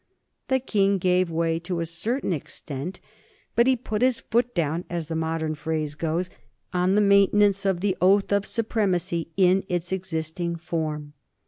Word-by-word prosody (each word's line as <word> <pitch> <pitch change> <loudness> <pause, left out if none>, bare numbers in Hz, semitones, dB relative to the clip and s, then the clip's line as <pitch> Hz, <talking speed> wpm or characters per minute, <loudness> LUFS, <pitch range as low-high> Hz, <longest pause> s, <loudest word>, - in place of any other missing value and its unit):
The 265 0 +2
King 200 -5 +2
gave 180 -1 +2
way 165 0 0
to 175 0 -3
a 165 - -1
certain 195 - -2
extent, 145 +2 -6 0.6
but 235 +1 +4
he 265 - +5
put 220 -3 -4
his 255 -1 +3
foot 240 +1 0
down, 165 0 0
as 170 -2 -4
the 165 - -2
modern 160 -1 -1
phrase 155 -1 -3
goes, 165 +4 -2 0.4
on 180 +2 +2
the 210 - +4
maintenance 200 0 +4
of 185 -2 0
the 195 -2 +1
Oath 195 +3 +4
of 200 0 +1
Supremacy 190 -7 0
in 190 0 +4
its 175 0 -2
existing 170 -2 -3
form. 155 -3 -4
180 Hz, 160 wpm, -25 LUFS, 165-200 Hz, 0.6 s, he